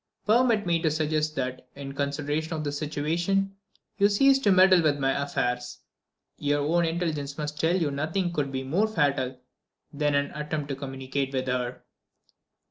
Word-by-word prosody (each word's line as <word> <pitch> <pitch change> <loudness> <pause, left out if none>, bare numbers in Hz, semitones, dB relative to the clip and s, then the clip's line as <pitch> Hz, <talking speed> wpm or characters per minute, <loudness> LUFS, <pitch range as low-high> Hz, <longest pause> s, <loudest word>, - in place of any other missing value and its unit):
Permit 225 -1 +3
me 170 -1 +1
to 160 - +2
suggest 155 0 0
that, 130 -1 -4
in 140 -1 -7
consideration 145 +3 -2
of 155 - -3
this 145 -1 -3
situation, 170 +6 -1 0.4
you 200 +1 +5
cease 270 +6 +5
to 210 -7 +3
meddle 185 -1 +6
with 150 -3 +2
my 135 -1 +1
affairs. 125 -3 -2 0.6
Your 145 0 +1
own 170 +4 +2
intelligence 160 -4 -2
must 150 -1 -4
tell 165 +2 +2
you 155 -4 0
nothing 160 +5 -1
could 145 -4 -1
be 130 0 -3
more 175 +11 +1
fatal 140 -9 0 0.5
than 145 0 +1
an 140 0 +1
attempt 150 -1 -4
to 135 - -2
communicate 135 0 -4
with 130 -1 -1
her." 125 -1 -2
150 Hz, 165 wpm, -27 LUFS, 140-170 Hz, 0.6 s, meddle